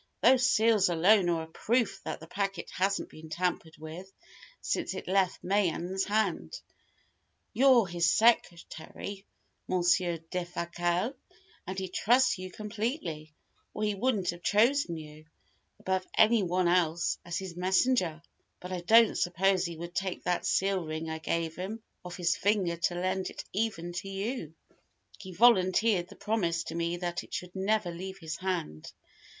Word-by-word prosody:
Those 255 -1 +5
seals 220 -4 +4
alone 180 +3 +4
are 165 -1 0
a - - -10
proof 215 +4 0
that - - -4
the 160 - -10
packet 195 0 -3
hasn't 195 +2 0
been 155 0 -12
tampered 170 -1 -2
with 165 +5 -9 0.5
since - - -2
it - - -7
left 190 0 +1
Mayen's 190 -1 0
hands. 215 - -1 0.9
You're 255 -3 +5
his 170 -2 +1
secretary, 195 -2 0 0.4
Monsieur 175 -1 +2
Defasquelle, 175 - -2 0.5
and 190 +1 -5
he 190 -1 -2
trusts 240 +4 +2
you 185 0 -6
completely, 210 - -4 0.4
or 215 - -3
he 210 -1 +1
wouldn't 200 -3 0
have 175 0 -11
chosen 215 - +2
you, 155 0 -11 0.5
above 190 0 -1
any 220 0 +5
one 180 -1 +1
else, 170 -2 +1
as 175 -1 -4
his 190 -3 -6
messenger. 185 -2 +1 0.4
But 180 - -8
I 180 -1 -3
don't 225 +5 +5
suppose 185 +1 +1
he 170 -2 -5
would 170 +1 -7
take 190 -1 -3
that 180 -1 0
seal 195 -1 +1
ring 160 0 -4
I 160 - -4
gave 165 0 -2
him 210 +5 -6 0.2
off 175 -1 -8
his 175 0 +1
finger 200 -4 +1
to 175 +1 0
lend 185 +1 -1
it - - -8
even 190 -5 -2
to 185 +3 -5
you. 195 - -4 0.6
He 190 -2 -9
volunteered 190 -2 +4
the - - -12
promise 175 -6 -1
to - - -7
me 170 +1 -1
that 175 -1 -3
it - - -8
should 180 +1 -6
never 195 -1 0
leave 190 +3 -7
his 160 -3 -6
hand. 180 - -4
185 Hz, 155 wpm, -29 LUFS, 170-205 Hz, 0.9 s, Those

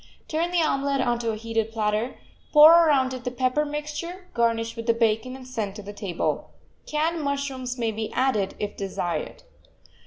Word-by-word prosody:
Turn 330 +2 0
the 350 -2 +2
omelet 275 -2 +1
onto 240 -2 0
a 220 - -1
heated 225 0 -2
platter, 215 +2 -1 0.3
pour 300 +1 +10 0.2
around 265 -3 +3
it 255 -1 -6
the 250 - -1
pepper 255 +4 0
mixture, 300 +5 -5
garnish 230 -1 0
with 230 0 -6
the 230 - +4
bacon, 230 +2 +1
and 260 -1 -11
send 215 -6 -3
to 210 - -8
the 205 +1 -8
table. 195 -4 -2 0.4
Canned 320 +2 0
mushrooms 275 -3 -3
may 230 -2 0
be 220 0 -4
added, 215 -7 +1
if 205 0 -4
desired. 190 - -4
250 Hz, 175 wpm, -25 LUFS, 225-285 Hz, 0.4 s, pour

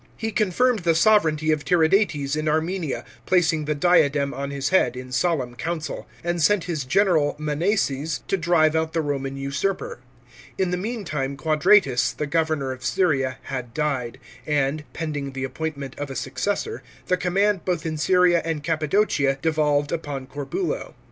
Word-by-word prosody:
He 225 0 -3
confirmed 220 +3 +2
the 170 -2 +2
sovranty 160 -5 +3
of 155 -1 0
Tiridates 160 -4 +2
in 155 0 -2
Armenia, 160 0 -1 0.2
placing 160 -4 +2
the 150 0 -1
diadem 145 -3 +3
on 140 0 -4
his 140 0 -2
head 125 -10 +2
in 125 0 -8
solemn 135 -4 0
council; 160 +4 -4 0.2
and 175 0 -1
sent 190 +3 +3
his 160 -6 -3
general 160 0 +2
Monseses 150 -1 -1
to - - +1
drive 165 -3 +3
out 160 0 0
the 165 - +1
Roman 135 -2 -3
usurper. 195 - -2 0.6
In 185 -2 0
the - - +1
meantime 175 - -3
Quadratus, 155 -4 +3
the 150 - -3
governor 155 -3 0
of 130 -1 -8
Syria, 135 -1 +1
had 125 -3 -6
died, 130 -5 -2 0.3
and, 150 0 0
pending 145 -4 -4
the 135 0 -4
appointment 140 0 -4
of 145 -1 -4
a 135 - -6
successor, 205 - -2 0.2
the 180 - +2
command 190 +1 +1
both 175 -3 -2
in 160 -1 -2
Syria 180 +1 +4
and 160 -3 -3
Cappadocia, 155 -3 +1
devolved 150 -3 +1
upon 145 -5 -4
Corbulo. 340 - -4
155 Hz, 155 wpm, -23 LUFS, 140-180 Hz, 0.6 s, Syria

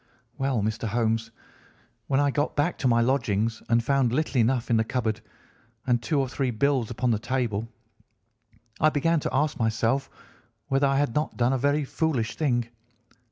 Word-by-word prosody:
"Well, 135 -6 0
Mr. 110 +1 -2
Holmes, 115 0 0 0.8
when 135 0 +2
I 145 -1 +2
got 145 +2 -1
back 150 +4 +1
to 130 - +1
my 115 -1 +4
lodgings 115 -3 0
and 115 0 +3
found 135 -1 +2
little 135 -2 +1
enough 120 +1 0
in 115 - +4
the 110 - +3
cupboard, 115 -2 -2 0.6
and 120 -2 +2
two 140 +6 0
or 135 - +1
three 130 +1 -2
bills 125 0 +1
upon 125 +1 0
the 110 - +1
table, 120 -3 -2 1.1
I 155 - +5
began 160 +2 +1
to - - -2
ask 145 +2 0
myself 115 +4 0 0.6
whether 135 +1 +3
I 135 0 +1
had 145 -5 +1
not 150 +1 -2
done 125 +2 +2
a - - +1
very 145 +2 +1
foolish 130 -7 -1
thing. 120 -6 0
125 Hz, 175 wpm, -26 LUFS, 115-140 Hz, 1.1 s, I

